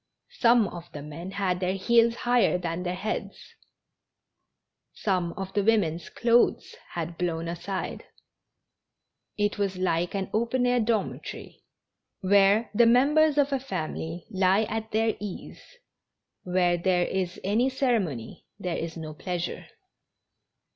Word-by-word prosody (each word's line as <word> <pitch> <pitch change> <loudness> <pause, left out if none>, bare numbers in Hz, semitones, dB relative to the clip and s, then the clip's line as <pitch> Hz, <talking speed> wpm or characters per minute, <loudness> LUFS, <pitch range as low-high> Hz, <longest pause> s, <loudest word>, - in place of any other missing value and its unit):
Some 235 -3 +5
of 175 -1 -10
the 145 - -7
men 160 +5 -7
had 190 -2 -1
their 185 +1 0
heels 230 +3 +3
higher 245 -6 +2
than 170 -1 -3
their 180 0 -2
heads, 210 +4 -5 1.4
some 180 -4 0
of 195 -1 -6
the 205 - +1
women's 180 -7 +1
clothes 240 - +2 0.2
had 170 0 -5
blown 165 -2 -1
aside; 180 +3 -4 1.3
it 205 0 0
was 195 -2 -1
like 175 0 0
an 195 -1 -3
open 235 +3 +1
air 245 0 +3
dormitory, 220 -2 -3 0.6
where 200 +3 +4
the 230 +2 +5
members 295 +5 +4
of 285 -1 +3
a 270 - +1
family 170 -7 -5
lie 190 +2 +3
at 220 +1 -4
their 220 0 +1
ease; 205 -3 -7 0.8
where 180 -1 +1
there 180 0 +2
is 185 -2 -2
any 220 +7 +2
ceremony, 220 - -1
there 180 -3 -2
is 165 0 -5
no 155 -1 -6
pleasure. 175 +2 -4
195 Hz, 130 wpm, -27 LUFS, 175-230 Hz, 1.4 s, Some